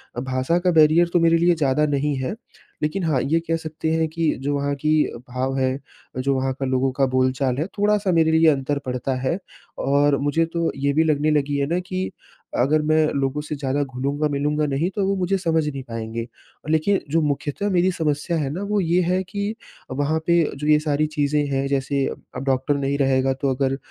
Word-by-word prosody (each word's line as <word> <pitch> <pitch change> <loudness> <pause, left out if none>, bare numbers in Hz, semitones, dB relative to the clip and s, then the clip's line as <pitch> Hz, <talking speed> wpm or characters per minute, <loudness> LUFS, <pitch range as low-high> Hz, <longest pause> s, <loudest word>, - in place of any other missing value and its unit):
अ, - - -2
भाषा 130 +6 0
का 180 0 +2
बैरियर 160 +2 +5
तो 175 - +4
मेरे 165 0 +4
लिए 170 +1 +3
ज़्यादा 150 0 +2
नहीं 145 0 0
है, 130 +11 -3 0.5
लेकिन 180 +5 -1
हाँ, 150 -6 +1
ये 160 +4 +1
कह 165 - +1
सकते 160 0 -4
हैं 160 0 +1
कि 165 -1 0
जो 145 +1 -1
वहाँ 140 0 -1
की 155 +2 -1 0.4
भाव 130 +2 -2
है, 130 +1 0 0.4
जो 135 +2 +1
वहाँ 130 0 0
का 135 - -1
लोगों 130 0 +1
का 135 +1 +1
बोल-चाल 130 0 +1
है, 155 - 0
थोड़ा-सा 205 -1 +2
मेरे 160 -1 +3
लिए 160 0 +4
अंतर 140 0 0
पडता 130 +1 -2
है 135 +7 0 0.4
और 140 0 +3
मुझे 145 +4 +1
तो 170 -1 0
ये 140 +1 0
भी 160 +2 +3
लगने 155 0 +2
लगी 145 -1 +1
है 140 - +1
ना 175 +3 0
कि, 185 +1 -3 0.5
अगर 150 +5 +3
मैं 155 0 +3
लोगों 140 +1 -1
से 150 0 -5
ज़्यादा 140 +1 -1
घुलूँगा-मिलूँगा 145 +3 -1
नहीं, 145 +6 0
तो 195 -1 -1
वो 195 - +1
मुझे 190 +1 0
समझ 160 -4 +1
नहीं 140 -2 -4
पाएँगे। 115 -1 -5 0.4
लेकिन 160 +6 +2
जो 165 +1 +3
मुख्यतः 150 +7 -1
मेरी 185 0 +2
समस्या 160 0 -1
है 140 -3 -1
ना, 180 - -4
वो 210 0 0
ये 175 +2 +2
है 180 +2 +1
कि 200 +3 -4 0.4
वहाँ 145 +4 0
पे 170 0 +4 0.2
जो 150 - -4
ये 150 0 +5
सारी 150 0 0
चीज़ें 150 -1 0
हैं, 135 0 0
जैसे 140 0 0 0.3
अब 130 - -4
डॉक्टर 135 +2 +1
नहीं 140 0 -1
रहेगा, 135 -1 +2
तो 135 0 -1
अगर 135 0 0
150 Hz, 210 wpm, -22 LUFS, 135-165 Hz, 0.5 s, बैरियर